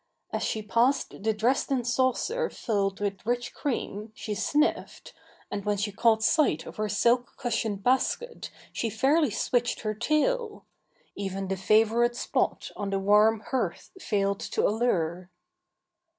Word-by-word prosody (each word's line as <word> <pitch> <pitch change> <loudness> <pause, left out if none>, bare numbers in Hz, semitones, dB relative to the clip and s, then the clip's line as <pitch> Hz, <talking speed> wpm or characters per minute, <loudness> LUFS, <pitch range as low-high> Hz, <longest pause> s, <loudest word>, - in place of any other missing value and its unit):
As - - -2
she 215 - -2
passed 235 +3 +1
the 220 +2 +2
Dresden 245 +4 +1
saucer 260 - 0
filled 200 -3 -1
with 200 -2 -3
rich 240 +2 -2
cream 220 -6 -3
she 215 - -4
sniffed, 295 +9 -1 0.4
and 200 -1 -3
when 205 0 0
she 205 +1 -1
caught 220 +1 +2
sight 290 - +2
of - - -10
her 215 0 -1
silk 235 +4 +2
cushioned 220 -4 -2
basket 265 - 0 0.2
she 230 - -1
fairly 275 +7 +2
switched 240 +3 0
her 215 -1 -1
tail. 415 - 0 0.5
Even 195 -1 -4
the 195 - 0
favourite 225 +5 +3
spot - - -1
on 205 - -3
the 195 - 0
warm 210 +2 +4
hearth 230 -10 -2
failed 200 - 0
to - - 0
allure. 185 -6 0
220 Hz, 140 wpm, -27 LUFS, 205-245 Hz, 0.5 s, warm